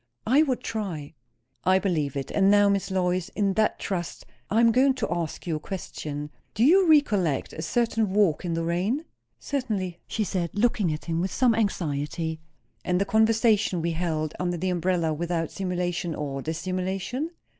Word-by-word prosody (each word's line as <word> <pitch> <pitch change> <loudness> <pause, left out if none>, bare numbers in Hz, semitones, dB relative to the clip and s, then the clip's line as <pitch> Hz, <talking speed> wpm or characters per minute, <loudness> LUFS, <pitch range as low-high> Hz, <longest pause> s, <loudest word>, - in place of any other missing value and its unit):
"I 265 +7 +5
would 265 -5 0
try." 175 -10 -4 0.5
"I 185 +1 +4
believe 160 -8 -1
it. 135 - -4
And 195 -1 +3
now, 205 0 +5
Miss 200 -1 0
Lois, 180 -2 0
in 200 -2 +1
that 215 +2 +1
trust, 175 -6 -4 0.2
I 220 - +2
am 230 0 +6
going 260 +3 +4
to - - -2
ask 170 -3 -4
you 165 -3 -1
a - - -7
question. 150 -4 -6 0.2
Do 220 - +2
you 355 +6 +5
recollect 205 - +3
a 160 - -5
certain 225 +4 0
walk 190 -6 +2
in 170 -2 -2
the 165 - -1
rain?" 190 - -1 0.3
"Certainly!" 205 -10 -3
she 220 - -1
said, 180 -4 -2
looking 205 -5 +2
at 150 - -5
him 165 0 -1
with 185 - -1
some 250 -3 +3
anxiety. 160 -6 -1 0.4
"And 180 0 +1
the 200 - +1
conversation 220 -3 +3
we 170 +1 -1
held 160 -2 -2
under 175 -1 -1
the 185 +2 -1
umbrella, 175 -2 0
without 165 0 -2
simulation 175 -3 -2
or 140 -2 -4
dissimulation?" 185 - -3
185 Hz, 175 wpm, -26 LUFS, 165-215 Hz, 0.5 s, am